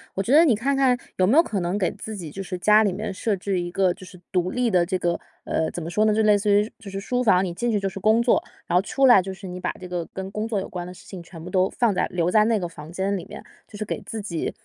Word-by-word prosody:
我 195 Hz, -, -1 dB
觉 230 Hz, -, -2 dB
得 315 Hz, +3 st, +8 dB
你 275 Hz, -9 st, +4 dB
看 270 Hz, +6 st, 0 dB
看 265 Hz, -2 st, +3 dB, 0.2 s
有 185 Hz, -, +3 dB
没 250 Hz, +9 st, +4 dB
有 330 Hz, -, +7 dB
可 210 Hz, -, -3 dB
能 175 Hz, +2 st, -1 dB
给 190 Hz, -3 st, 0 dB
自 215 Hz, +1 st, -7 dB
己 165 Hz, -5 st, -7 dB
就 195 Hz, -, -6 dB
是 185 Hz, -1 st, -5 dB
家 210 Hz, +4 st, +5 dB
里 205 Hz, -, +1 dB
面 210 Hz, +2 st, -4 dB
设 210 Hz, +2 st, -1 dB
置 190 Hz, 0 st, -2 dB
一 175 Hz, -, -4 dB
个 185 Hz, 0 st, +1 dB
就 190 Hz, -, -14 dB
是 180 Hz, -, -13 dB
独 180 Hz, -1 st, +1 dB
立 245 Hz, +2 st, 0 dB
的 180 Hz, -2 st, +4 dB
这 185 Hz, +2 st, -1 dB
个， 175 Hz, -1 st, -1 dB, 0.2 s
呃 160 Hz, -, -1 dB
怎 175 Hz, -, -6 dB
么 -, -, -6 dB
说 210 Hz, -, +2 dB
呢， 215 Hz, -, +3 dB
就 220 Hz, +1 st, +2 dB
类 210 Hz, -1 st, +5 dB
似 205 Hz, +1 st, +1 dB
于 205 Hz, +2 st, +3 dB
就 205 Hz, -, -10 dB
是 195 Hz, 0 st, -5 dB
书 245 Hz, +5 st, -1 dB
房， 190 Hz, -5 st, +4 dB
你 175 Hz, -, -4 dB
进 240 Hz, +7 st, -1 dB
去 210 Hz, -, +1 dB
就 195 Hz, -, -1 dB
是 195 Hz, -, -6 dB
工 215 Hz, +4 st, +4 dB
作。 240 Hz, -, +3 dB, 0.2 s
然 170 Hz, -, -1 dB
后 180 Hz, -, +5 dB
出 260 Hz, +7 st, +1 dB
来 240 Hz, -7 st, +7 dB
就 190 Hz, +1 st, -6 dB
是 190 Hz, +1 st, -9 dB
你 180 Hz, 0 st, -6 dB
把 -, -, -2 dB
这 185 Hz, -, -8 dB
个 175 Hz, -1 st, -3 dB
跟 190 Hz, 0 st, -6 dB
工 215 Hz, +2 st, -3 dB
作 220 Hz, -3 st, -1 dB
有 190 Hz, -, -5 dB
关 175 Hz, -1 st, -6 dB
的 -, -, -8 dB
事 -, -, -16 dB
情 185 Hz, -3 st, -9 dB
全 170 Hz, -1 st, -12 dB
部 180 Hz, -, -8 dB
都 185 Hz, 0 st, +2 dB
放 235 Hz, -4 st, +1 dB
在 -, -, 0 dB
留 175 Hz, -1 st, 0 dB
在 215 Hz, +1 st, +5 dB
那 225 Hz, 0 st, +2 dB
个 180 Hz, -4 st, -3 dB
房 160 Hz, -2 st, -11 dB
间 190 Hz, +3 st, -1 dB
里 185 Hz, -, -4 dB
面， -, -, -10 dB, 0.2 s
就 205 Hz, -, -11 dB
是 215 Hz, -, -4 dB
给 215 Hz, -, -4 dB
自 220 Hz, +2 st, -6 dB
己， 180 Hz, -6 st, -3 dB
195 Hz, 350 characters per minute, -24 LUFS, 180-215 Hz, 0.2 s, 得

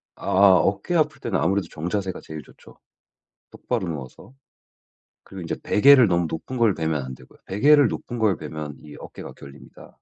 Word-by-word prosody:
아아 95 Hz, 0 st, +4 dB
어깨 100 Hz, -, -1 dB
아플 155 Hz, -3 st, +1 dB
때는 115 Hz, -7 st, -2 dB
아무래도 95 Hz, -1 st, 0 dB
정자세가 95 Hz, +4 st, -4 dB
제일 80 Hz, -1 st, -9 dB
좋죠. -, -, -19 dB, 0.7 s
똑바로 115 Hz, -6 st, -4 dB
누워서. 75 Hz, -, -9 dB, 0.9 s
그리고 95 Hz, -2 st, -10 dB
이제 85 Hz, -, -4 dB
베개를 130 Hz, +1 st, +6 dB
너무 85 Hz, -2 st, +1 dB
높은 125 Hz, +11 st, -6 dB
걸 115 Hz, -5 st, +3 dB
베면 80 Hz, -3 st, -2 dB
안 65 Hz, -, -7 dB
되고요. 65 Hz, 0 st, -19 dB
베개를 140 Hz, +8 st, +4 dB
높은 120 Hz, +2 st, -6 dB
걸 105 Hz, -5 st, +2 dB
베면 75 Hz, -1 st, -7 dB
이 75 Hz, -1 st, -12 dB
어깨가 -, -, -10 dB
결립니다. 70 Hz, 0 st, -14 dB
95 Hz, 365 characters per minute, -23 LUFS, 80-115 Hz, 0.9 s, 베개를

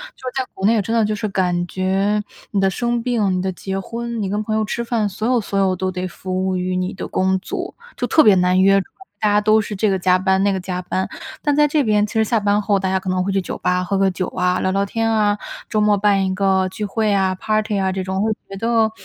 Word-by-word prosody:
就 -, -, -23 dB
是 265 Hz, +1 st, -2 dB
在 -, -, -4 dB
国 190 Hz, -, -4 dB
内 225 Hz, 0 st, +3 dB
真 225 Hz, +4 st, -2 dB
的 225 Hz, -, +3 dB
就 215 Hz, -, -1 dB
是 215 Hz, +1 st, -3 dB
感 180 Hz, -2 st, 0 dB
觉 195 Hz, +3 st, 0 dB, 0.3 s
你 200 Hz, -, +1 dB
的 195 Hz, -, +3 dB
生 240 Hz, +4 st, -1 dB
病、 225 Hz, -6 st, +1 dB
你 -, -, -1 dB
的 190 Hz, 0 st, -1 dB
结 190 Hz, +2 st, -4 dB
婚、 235 Hz, +2 st, -5 dB
你 195 Hz, -, -2 dB
跟 210 Hz, +2 st, -1 dB
朋 215 Hz, 0 st, -2 dB
友 220 Hz, -, +1 dB
吃 235 Hz, +3 st, -3 dB
饭， 230 Hz, -3 st, 0 dB
所 215 Hz, +3 st, -3 dB
有 245 Hz, -2 st, +2 dB
所 200 Hz, -1 st, -4 dB
有 190 Hz, -1 st, +2 dB
都 185 Hz, +1 st, -2 dB
得 185 Hz, 0 st, -3 dB
服 185 Hz, +1 st, -3 dB
务 185 Hz, -, 0 dB
于 180 Hz, 0 st, -2 dB
你 185 Hz, 0 st, -2 dB
的 -, -, -6 dB
工 190 Hz, 0 st, +1 dB
作， -, -, -5 dB, 0.2 s
就 -, -, -1 dB
特 310 Hz, -, +5 dB
别 210 Hz, -3 st, +6 dB
难 180 Hz, 0 st, +3 dB
约。 195 Hz, +1 st, +5 dB
主 -, -, -10 dB
要 -, -, -50 dB, 0.3 s
大 215 Hz, -, +2 dB
家 210 Hz, -, +4 dB
都 215 Hz, +1 st, +4 dB
是 210 Hz, -, -5 dB
这 210 Hz, +2 st, +1 dB
个 190 Hz, -, +1 dB
加 185 Hz, +1 st, +3 dB
班， 190 Hz, +1 st, +2 dB
那 200 Hz, -, +2 dB
个 190 Hz, -, -2 dB
加 180 Hz, 0 st, -4 dB
班， 185 Hz, +1 st, -2 dB, 0.3 s
但 290 Hz, -1 st, +1 dB
在 295 Hz, 0 st, +4 dB
这 295 Hz, 0 st, +1 dB
边 210 Hz, -3 st, +2 dB
其 -, -, -10 dB
实 220 Hz, -1 st, +3 dB
下 230 Hz, +1 st, +1 dB
班 205 Hz, 0 st, +1 dB
后 205 Hz, -1 st, +1 dB
大 190 Hz, -1 st, -1 dB
家 190 Hz, 0 st, +1 dB
可 190 Hz, -, -5 dB
能 185 Hz, 0 st, +1 dB
会 195 Hz, -, -1 dB
去 195 Hz, -, +1 dB
酒 -, -, -5 dB
吧 180 Hz, 0 st, +1 dB
喝 195 Hz, +2 st, -1 dB
个 195 Hz, 0 st, +3 dB
酒 185 Hz, 0 st, -3 dB
啊、 180 Hz, 0 st, 0 dB
聊 -, -, 0 dB
聊 195 Hz, +1 st, +1 dB
天 225 Hz, +3 st, -1 dB
啊， 210 Hz, -2 st, +2 dB, 0.3 s
周 215 Hz, -, +1 dB
末 210 Hz, -1 st, +3 dB
办 200 Hz, -1 st, +2 dB
一 190 Hz, -, -1 dB
个 190 Hz, -1 st, +2 dB
聚 210 Hz, +3 st, -4 dB
会 215 Hz, +1 st, 0 dB
啊， 190 Hz, -1 st, +2 dB
party 215 Hz, +1 st, -1 dB
啊， 190 Hz, -1 st, +1 dB
这 190 Hz, 0 st, -3 dB
种 190 Hz, +1 st, -2 dB
会 220 Hz, -, +1 dB, 0.2 s
觉 195 Hz, -, -7 dB
得 225 Hz, 0 st, +2 dB
195 Hz, 320 characters per minute, -20 LUFS, 190-215 Hz, 0.3 s, 别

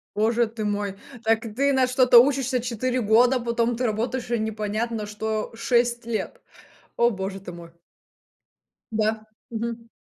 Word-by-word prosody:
Боже 225 Hz, +2 st, +2 dB
ты 220 Hz, -1 st, -6 dB
мой, 205 Hz, -1 st, -2 dB, 0.3 s
так 225 Hz, 0 st, +3 dB, 0.2 s
ты 280 Hz, +2 st, +3 dB
на 260 Hz, -1 st, +3 dB
что-то 250 Hz, -1 st, +6 dB
учишься 265 Hz, -1 st, +1 dB
4 250 Hz, +2 st, -2 dB
года, 240 Hz, +4 st, +4 dB
потом 235 Hz, 0 st, 0 dB
ты 250 Hz, -, -2 dB
работаешь 240 Hz, +3 st, -2 dB
и 235 Hz, -, +1 dB
непонятно 215 Hz, +1 st, -2 dB
что 215 Hz, +1 st, -3 dB
6 240 Hz, 0 st, +1 dB
лет. 230 Hz, -2 st, -4 dB, 0.6 s
О 235 Hz, 0 st, +4 dB
боже 195 Hz, -1 st, -4 dB
ты 180 Hz, -2 st, -9 dB
мой. 170 Hz, -1 st, -11 dB, 1.2 s
Да, 220 Hz, 0 st, -1 dB, 0.2 s
мгм. 230 Hz, 0 st, -5 dB
230 Hz, 145 wpm, -24 LUFS, 215-245 Hz, 1.2 s, что-то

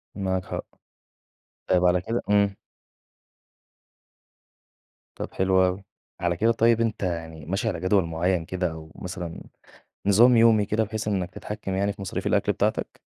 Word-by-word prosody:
معاك 95 Hz, -2 st, -1 dB
حق. -, -, -5 dB, 1.0 s
طيب 90 Hz, 0 st, +3 dB
على 90 Hz, 0 st, +4 dB
كده 115 Hz, +6 st, -2 dB
إمم. 100 Hz, -1 st, +3 dB, 2.6 s
طب -, -, -6 dB
حلو 95 Hz, 0 st, +3 dB
أوي. 90 Hz, +2 st, -2 dB, 0.4 s
على 85 Hz, -1 st, 0 dB
كده 115 Hz, +4 st, +3 dB
طيب 115 Hz, 0 st, +3 dB
أنت 110 Hz, -3 st, -1 dB
يعني 80 Hz, -4 st, -4 dB
ماشي 95 Hz, +7 st, -2 dB
على 90 Hz, -6 st, -1 dB
جدول 95 Hz, 0 st, +2 dB
معين 85 Hz, +1 st, 0 dB
كده 90 Hz, -2 st, -2 dB
أو 80 Hz, 0 st, -10 dB
مثلًا 90 Hz, -2 st, -6 dB, 0.7 s
نظام 120 Hz, +5 st, +6 dB
يومي 115 Hz, -2 st, +5 dB
كده، 110 Hz, +2 st, +1 dB
بحيث 110 Hz, 0 st, -4 dB
إنك 95 Hz, -4 st, -1 dB
تتحكم 95 Hz, 0 st, -6 dB
يعني 100 Hz, +1 st, +1 dB
في -, -, -14 dB
مصاريف 95 Hz, -, -4 dB
الأكل -, -, +2 dB
بتاعتك؟ -, -, -2 dB
95 Hz, 145 wpm, -25 LUFS, 90-105 Hz, 2.6 s, نظام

